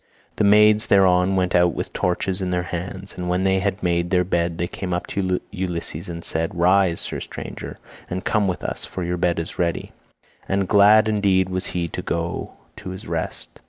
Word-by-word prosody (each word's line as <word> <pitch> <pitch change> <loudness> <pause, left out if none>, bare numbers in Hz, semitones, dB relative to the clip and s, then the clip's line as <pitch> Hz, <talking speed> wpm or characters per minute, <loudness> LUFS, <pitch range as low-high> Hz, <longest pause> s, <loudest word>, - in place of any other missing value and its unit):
The - - +2
maids 105 +1 +5
thereon 95 -1 +4
went 90 -1 +1
out 90 -1 +3
with - - -4
torches 90 +2 -1
in 95 - -1
their 90 -1 0
hands, 90 +2 -6
and 90 -1 -4
when 90 +1 +1
they 95 0 +2
had 100 +1 -2
made 85 -1 +1
the 90 -1 +3
bed 85 -2 0
they 85 - 0
came 90 0 -4
up 90 - -3
to 95 -2 0
Ulysses 85 -3 -3
and 85 -1 -6
said, 80 +2 -2
"Rise, 90 0 +3
sir - - -3
stranger, - - -7 0.3
and 95 +1 -4
come 105 -2 +2
with 90 - -3
us - - -4
for 95 - -5
your 90 +1 -2
bed 85 -1 +1
is 85 +3 -5
ready," 85 -2 -1 0.6
and 100 -1 +1
glad 105 +2 +6
indeed 100 -3 +2
was 95 0 0
he 85 -1 0
to - - -5
go 85 0 -3 0.2
to - - -7
his 95 +2 -8
rest. 80 -1 -4
90 Hz, 200 wpm, -22 LUFS, 85-95 Hz, 0.6 s, glad